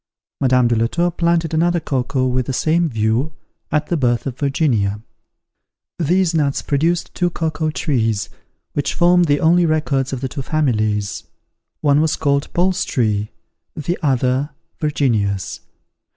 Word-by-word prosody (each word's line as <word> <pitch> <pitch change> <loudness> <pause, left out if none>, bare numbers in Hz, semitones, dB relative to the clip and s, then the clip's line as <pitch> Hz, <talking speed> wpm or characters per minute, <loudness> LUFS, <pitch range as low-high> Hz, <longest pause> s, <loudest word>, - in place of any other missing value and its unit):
Madame 125 -2 +3
de 120 - +1
la 115 +1 +2
Tour 175 +7 0
planted 170 -1 0
another 175 +2 +2
cocoa 130 -3 -1
with 125 -1 0
the 135 - -2
same 165 +5 +1
view, 115 +5 0 0.4
at 150 0 +1
the 175 - -1
birth 120 -6 +1
of 135 -3 -3
Virginia. 135 - +1 1.0
These 175 +2 +2
nuts 145 -4 0
produced 165 +5 0
two 175 -1 0
cocoa 160 -2 -2
trees, 115 -9 0 0.5
which 145 - -1
formed 175 0 +4
the 145 -2 +2
only 170 +1 +4
records 150 -4 0
of 130 -2 -4
the 135 - -1
two 135 +2 -5
families; 110 - -1 0.6
one 145 0 +3
was 160 0 +1
called 140 -2 0
Paul's 185 +1 +1
tree, 105 -5 0 0.5
the 160 +4 -2
other, 130 -1 +1 0.3
Virginia's. 110 - 0
145 Hz, 145 wpm, -19 LUFS, 125-160 Hz, 1.0 s, formed